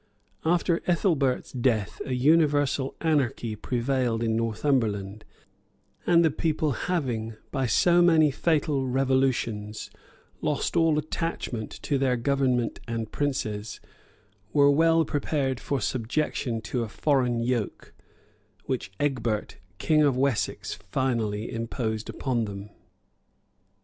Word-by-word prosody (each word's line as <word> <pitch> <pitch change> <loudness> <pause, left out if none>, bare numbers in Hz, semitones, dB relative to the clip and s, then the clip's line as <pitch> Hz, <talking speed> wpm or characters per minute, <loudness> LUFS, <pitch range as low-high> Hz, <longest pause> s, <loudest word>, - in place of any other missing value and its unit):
After 170 +1 +2
Ethelbert's 160 -8 +1
death, 120 -6 0
a 130 - -3
universal 145 -1 +2
anarchy 130 -8 0
prevailed 120 0 -1
in 110 -1 +1
Northumberland; 110 -3 -1 0.8
and 170 -1 +5
the 160 - +3
people 155 0 0
having, 120 -7 -2 0.2
by 135 -3 0
so 175 +7 +4
many 160 -4 +5
fatal 150 -2 0
revolutions, 130 -5 0 0.5
lost - - -1
all 165 -2 +3
attachment 150 -7 -3
to 140 -3 0
their 130 -2 +2
government 125 -2 0
and 115 -2 -3
princes, 110 -7 -2 0.7
were 145 -1 +5
well 165 +2 +4
prepared 140 -3 -1
for 140 +1 -2
subjection 120 +1 -1
to 120 +2 -3
a 115 - -3
foreign 125 -2 +1
yoke; 120 -2 -2 0.7
which 125 -6 -3
Egbert, 120 -7 -1 0.2
king 155 - +3
of 140 -4 +3
Wessex, 130 -4 -1
finally 115 -5 -1
imposed 115 -1 -3
upon 120 -4 -1
them. 100 0 -8
130 Hz, 110 wpm, -26 LUFS, 115-150 Hz, 0.8 s, and